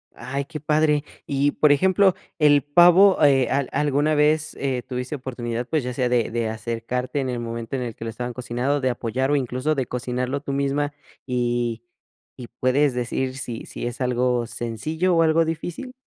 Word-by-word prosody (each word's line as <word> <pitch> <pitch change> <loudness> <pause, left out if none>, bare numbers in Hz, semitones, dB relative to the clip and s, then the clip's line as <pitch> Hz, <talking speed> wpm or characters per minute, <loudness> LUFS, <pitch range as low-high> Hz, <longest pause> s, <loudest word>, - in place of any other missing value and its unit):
Ay, 140 +2 -4
qué 155 0 -7
padre. 150 0 +2 0.2
Y, 140 +1 +1
por 150 0 +3
ejemplo, 190 +5 +4 0.2
el 145 -2 +5
pavo, 175 +6 +6
eh, 135 -3 +4
¿a 140 - +2
alguna 145 +1 +1
vez, 155 +1 +2
eh, 130 -3 -1
tuviste 125 +2 -4
oportunidad, 120 -3 -4
pues, 155 -4 0
ya 125 0 -4
sea 125 0 0
de 120 -2 +1
de 115 -1 -1
acercarte 120 +4 -3
en 130 -2 -2
el 125 - -3
momento 115 +1 -5
en 130 - -2
el 120 -3 -5
que - - -9
lo 115 - -3
estaban 120 +2 -5
cocinando, 125 +3 -1
de 130 - +1
apoyar 125 +4 -2
o - - +3
incluso 130 +3 -1
de 135 -4 -2
cocinarlo 125 +2 -3
tú 140 -1 -4
misma? 140 +1 0 0.3
Y 120 -2 -1 0.5
y 120 - -9
¿puedes 130 +3 +1
decir 130 +2 -2
sí 120 -3 -5
sí - - -6
es 120 +2 -5
algo 125 -1 +1
sencillo 155 - -2
o 165 - +4
algo 165 +1 +3
difícil? 165 +10 -5
130 Hz, 185 wpm, -23 LUFS, 120-150 Hz, 0.5 s, pavo